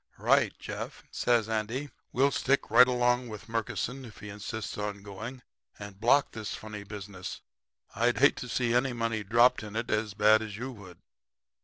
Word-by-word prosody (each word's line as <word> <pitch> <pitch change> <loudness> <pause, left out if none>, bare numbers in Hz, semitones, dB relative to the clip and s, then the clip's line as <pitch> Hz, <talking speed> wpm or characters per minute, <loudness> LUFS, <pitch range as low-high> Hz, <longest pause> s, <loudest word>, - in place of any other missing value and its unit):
"'Right, - - +3
Jeff,' - - -7
says 120 -3 +2
Andy. 115 +6 -2 0.2
'We'll 135 +3 +3
stick 140 +1 +1
right 125 - +8
along 125 0 +2
with 110 0 -9
Murkison 115 +3 -3
if 115 -4 -11
he 105 - -9
insists 105 +2 -5
on 105 -1 -4
going 110 +6 -8 0.3
and 100 -1 -9
block 130 +5 +4
this 110 -2 -5
funny 105 -1 -8
business. 100 -2 -7 0.5
I'd 120 +3 +2
hate 145 - +5
to 125 - -6
see 120 0 +1
any 125 +1 +2
money 115 -2 -1
dropped 120 +5 +4
in 105 -1 -8
it 115 +1 -2
as 105 -1 -1
bad 110 +1 +5
as 105 -2 -6
you 130 +4 -5
would.' 95 -7 -12
110 Hz, 175 wpm, -29 LUFS, 105-125 Hz, 0.5 s, right